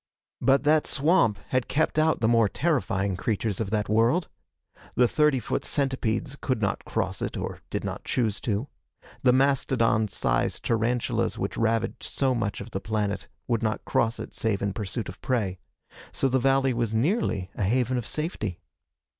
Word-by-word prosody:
But 135 +1 +4
that 155 +1 +3
swamp 140 - +3
had 130 -1 0
kept 155 +1 +1
out 155 -3 +2
the 110 - +3
more 115 -2 +4
terrifying 100 - 0
creatures 105 +1 -1
of 110 -4 -2
that 105 -1 0
world. 115 - +2 0.7
The 125 - +5
thirty 150 0 +3
foot 115 - -2
centipedes 135 -1 -1
could 130 -4 0
not 100 -2 -1
cross - - -2
it - - -3
or - - -4
did - - -3
not - - -4
choose 110 -5 -1
to. 110 +3 -1 0.5
The 125 - +5
mastodon 125 -5 +2
sized 100 - -1
tarantulas 115 +1 0
which - - -3
ravaged 115 0 0
so 135 -2 +1
much 110 -5 -2
of 105 +3 -9
the 95 - -3
planet 105 -2 -2 0.2
would 120 -3 +1
not 110 -2 -1
cross 115 0 +1
it - - -7
save 105 -3 -1
in 100 -1 0
pursuit 105 +1 -4
of 90 - -9
prey. 105 -8 -1 0.5
So 135 - +1
the 130 0 +2
valley 135 0 +3
was 115 -2 -1
nearly 115 - 0
a - - -3
haven 125 +4 +1
of 120 - -6
safety. 110 - -3
115 Hz, 170 wpm, -26 LUFS, 105-135 Hz, 0.7 s, The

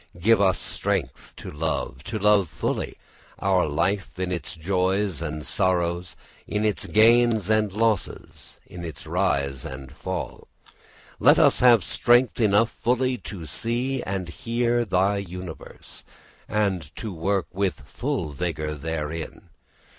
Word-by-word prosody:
Give 110 +4 +4
us 95 -2 +3
strength - - -3
to - - -8
love, 75 -3 -3
to 110 - -3
love 105 -4 +3
fully, - - -3 0.4
our 95 -3 +2
life 95 +7 -1
in 90 0 -2
its 85 -4 -4
joys 95 +1 0
and 75 -2 -4
sorrows, 90 -2 0 0.3
in 105 +1 -1
its 105 -2 -1
gains 110 -2 +4
and 110 -2 +2
losses, 110 0 -2
in 85 - -9
its 80 -2 -7
rise 70 -7 0
and 65 0 -8
fall. - - -5 0.7
Let - - +6
us - - +5
have 120 -5 +6
strength 120 +6 +3
enough 110 +1 +4
fully 125 +1 0
to 90 -6 -8
see 120 - -2
and 95 -3 -3
hear 120 +4 0
thy 100 +1 +2
universe, 90 -3 -8 0.4
and 100 -4 +1
to 110 -4 -5
work 95 +3 0
with 95 -4 -1
full - - -3
vigour 75 0 -3
therein. 80 +1 -5
95 Hz, 130 wpm, -25 LUFS, 85-110 Hz, 0.7 s, Let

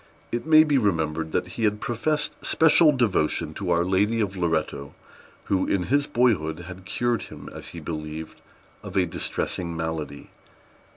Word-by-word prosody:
It 120 +6 -3
may 155 -1 +8
be 145 -3 +2
remembered 80 -6 0
that 90 - -1
he 115 - -5
had 105 -1 +2
professed 150 +7 -1
special 160 0 +6
devotion 90 - 0
to 95 +1 -4
Our 85 0 +2
Lady 100 +5 +2
of 100 -3 -1
Loretto, 80 -5 -2 0.5
who, 95 -1 0
in 95 -2 +1
his 145 0 +3
boyhood, 100 - +1
had 90 +1 -10
cured 120 +3 0
him, - - -10
as - - -9
he - - -8
believed, 80 0 -6 0.4
of - - -6
a 95 - +4
distressing 85 -1 -3
malady. 80 -3 -5
95 Hz, 160 wpm, -25 LUFS, 80-120 Hz, 0.5 s, may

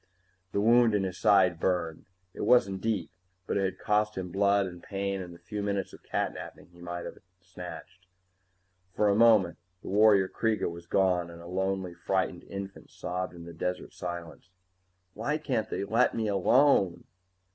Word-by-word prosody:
The - - 0
wound 115 +1 +5
in 100 - +1
his 95 -1 -4
side 95 -5 +4
burned. 85 -3 -1 0.3
It - - -7
wasn't 100 -6 +3
deep, 110 -7 -1 0.3
but - - -2
it 100 -1 +2
had 95 - -3
cost 105 0 0
him 90 -2 -4
blood 100 +1 +3
and 90 -2 -8
pain 100 0 -3
and 90 -1 -8
the 85 - -12
few 105 +3 -6
minutes 100 -2 -2
of - - -13
catnapping - - -4
he 85 0 -17
might 85 0 -5
have - - -8 0.2
snatched. 90 0 -10 0.9
For 105 - +3
a 100 - +3
moment, 105 -7 +5 0.2
the - - -7
warrior 100 -1 +5
Kreega 110 -3 -1
was 85 0 -10
gone 90 -2 +2
and 85 0 -11
a 85 - -11
lonely, 95 0 -2
frightened 95 -1 -2
infant 100 0 -8
sobbed 90 0 -4
in 85 -1 -10
the 85 - -9
desert 90 +2 -4
silence. 85 0 -7 0.7
_Why 135 +8 -1
can't 135 -8 -2
they - - -2
let 115 +5 +2
me 110 -1 -1
alone? 100 -1 +3
95 Hz, 175 wpm, -29 LUFS, 90-105 Hz, 0.9 s, wound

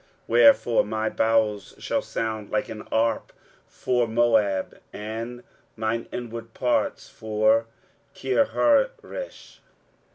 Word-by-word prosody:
23:016:011 - - -34 0.2
Wherefore 270 - +5
my 110 +1 -1
bowels 110 -3 +1
shall - - -1
sound 110 -2 -4
like 105 - -1
an 110 - -6
harp 115 0 0 0.4
for 125 -2 0
Moab, 110 -4 +1
and 115 +3 -6 0.3
mine 110 +1 -2
inward 115 -1 -7
parts 125 -1 0
for 110 +1 +1 0.5
Kirharesh. 470 - 0
115 Hz, 100 wpm, -25 LUFS, 110-120 Hz, 0.5 s, Wherefore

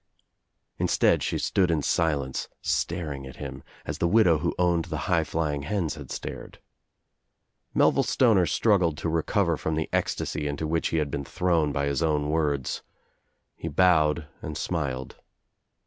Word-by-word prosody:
Instead - - +3
shC' - - -2
stood 95 -3 +2
in 80 -3 +1
silence, 70 -6 0
staring 75 -6 -2
at 65 - -10
him, - - -7 0.2
as - - -4
the 85 - +2
widow 90 -5 +4
who - - -1
owned 85 -2 +2
the - - -4
high - - +2
flying 75 -3 -2
hens 85 0 -1
had 75 -5 -10
stared. - - -7 1.2
Melville - - +4
Stoner 105 -9 +3
struggled 90 -3 +2
to 80 - -2
recover 85 +1 +1
from 80 - -2
the 80 0 -2
ecstasy 75 - -1
Into' 70 +2 -3
which 80 +1 0
he 80 - -1
had 75 -3 0
been 70 - -3
thrown 85 -1 +1
by 70 0 -1
his 70 +1 -1
own 75 -2 +1
words. 75 -4 0 0.7
He - - -6
bowed 80 -2 +3
and 75 -1 -5
smiled. 70 -8 -3
80 Hz, 155 wpm, -26 LUFS, 75-85 Hz, 1.2 s, widow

